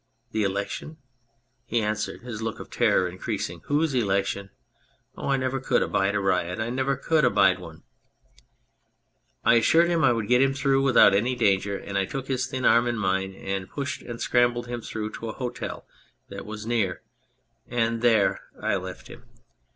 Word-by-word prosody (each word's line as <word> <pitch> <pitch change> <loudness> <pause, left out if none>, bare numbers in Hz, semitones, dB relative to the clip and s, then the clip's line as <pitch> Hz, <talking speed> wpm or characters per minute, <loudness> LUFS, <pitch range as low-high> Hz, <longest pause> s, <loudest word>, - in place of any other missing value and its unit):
" - - -46
The 110 - -1
election? 100 +10 -3 0.3
" - - -44 0.3
he 115 0 0
answered, 105 0 -2
his 120 -3 -7
look 110 -1 -3
of - - -10
terror 90 - +2
increasing. 90 -2 -4
" - - -26
Whose 150 +1 +1
election? 100 -3 0 0.7
Oh, - - -5
I 135 - +3
never 130 0 -1
could 130 -1 +1
abide 95 +1 0
a - - +2
riot! 90 -1 0
I 110 +1 -2
never 130 +2 0
could 155 +3 +1
abide 95 -1 +4
one! 80 -3 -11 0.8
" - - -43
I 120 - +6
assured 165 +9 +4
him 170 -2 +1
I - - +6
would 115 -3 -1
get 125 +1 +4
him 135 0 +2
through 135 -1 +2
without 135 -6 +6
any 120 +6 +1
danger, 100 -3 +1
and 100 0 -3
I 95 - +1
took 135 +6 -5
his 130 -1 0
thin 130 0 -3
arm 120 +1 +5
in 120 -1 -1
mine, 95 -1 -1
and 95 -1 -4
pushed 140 -2 -4
and 120 -1 -8
scrambled 120 -1 +2
him 120 0 -5
through 110 -1 -5
to 115 - -5
a - - -5
hotel 125 -2 -5 0.4
that - - -8
was 105 0 -7
near 110 -6 -1 0.6
and 115 -1 0
there 115 -5 +3 0.2
I - - 0
left - - -8
him. - - -13
115 Hz, 190 wpm, -26 LUFS, 100-130 Hz, 0.8 s, I